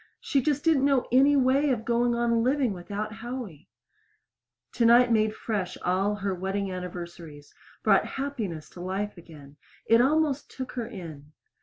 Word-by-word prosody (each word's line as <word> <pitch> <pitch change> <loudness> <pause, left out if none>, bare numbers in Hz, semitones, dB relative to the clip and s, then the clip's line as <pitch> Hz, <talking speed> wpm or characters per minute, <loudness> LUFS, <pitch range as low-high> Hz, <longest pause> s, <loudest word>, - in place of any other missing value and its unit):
she 275 - 0
just 290 +1 0
didn't 315 -5 +3
know 275 -3 +3
any 275 +3 +5
way 275 +2 +3
of 230 -4 -1
going 240 0 +1
on 235 -1 +1
living 255 -2 +1
without 205 +4 -5
Howie! 225 - -7 1.0
Tonight 240 +1 +5
made 215 -1 +2
fresh 195 -5 -3
all 195 +3 +1
her 200 -1 -2
wedding 190 +2 -3
anniversaries 170 -5 -8 0.3
brought - - +4
happiness 225 - -4
to - - -12
life 195 +3 -3
again. 150 -5 -14 0.3
It 230 +1 +5
almost 295 +1 +1
took 260 -1 -7
her 240 -3 -4
in. 155 -9 -10
220 Hz, 150 wpm, -27 LUFS, 185-255 Hz, 1.0 s, any